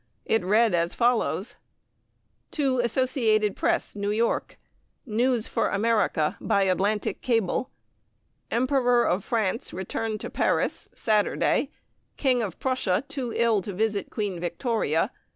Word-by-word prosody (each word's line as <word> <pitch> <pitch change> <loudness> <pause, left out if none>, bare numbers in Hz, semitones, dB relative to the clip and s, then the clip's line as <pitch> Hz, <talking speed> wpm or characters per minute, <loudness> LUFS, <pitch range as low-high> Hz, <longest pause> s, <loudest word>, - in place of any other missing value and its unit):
It 225 - +1
read 215 +3 +3
as 170 0 0
follows: 235 -2 +1 1.0
To 270 -4 +1
Associated 235 -4 +2
Press, 340 -7 0
New 205 0 -2
York. 225 +3 0 0.5
News 240 0 +1
for - - 0
America 200 -7 +1
by 200 - +2
Atlantic 195 +3 0
cable: 230 0 0 0.8
Emperor 245 -1 +2
of 185 +2 0
France 225 -1 -1
returned 215 +4 -3
to - - -6
Paris, - - 0
Saturday. 215 -2 +1 0.5
King 255 -3 +2
of 200 -6 -4
Prussia 255 -6 0
too 265 -5 -4
ill 230 -3 +3
to 200 +2 -6
visit 210 +1 -1
Queen 205 -5 -3
Victoria. 175 - 0
220 Hz, 120 wpm, -26 LUFS, 200-245 Hz, 1.0 s, read